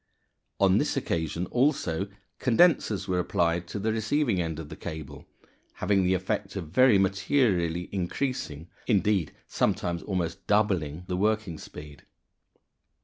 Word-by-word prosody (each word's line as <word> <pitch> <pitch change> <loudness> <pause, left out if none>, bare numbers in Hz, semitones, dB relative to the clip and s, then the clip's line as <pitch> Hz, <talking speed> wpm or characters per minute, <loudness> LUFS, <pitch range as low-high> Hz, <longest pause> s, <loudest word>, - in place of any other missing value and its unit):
On 95 -1 +5
this - - 0
occasion 85 +2 -1
also 120 - +1 0.3
condensers 115 - +3
were 90 -1 +1
applied 85 0 0
to - - -5
the 110 +2 0
receiving 110 -2 +1
end 80 -2 -3
of 80 -2 -7
the - - -7
cable, 80 -3 -8 0.5
having 100 -2 +1
the 90 +1 +3
effect 90 - -3
of 80 - -5
very 125 +4 +5
materially 95 - +1
increasing 90 - -3 0.2
indeed, 100 -6 +2
sometimes 85 -1 -1
almost 85 -4 -3
doubling 90 -7 +1
the 90 0 -2
working 105 -4 0
speed. 75 -1 -11
95 Hz, 130 wpm, -27 LUFS, 85-110 Hz, 0.5 s, On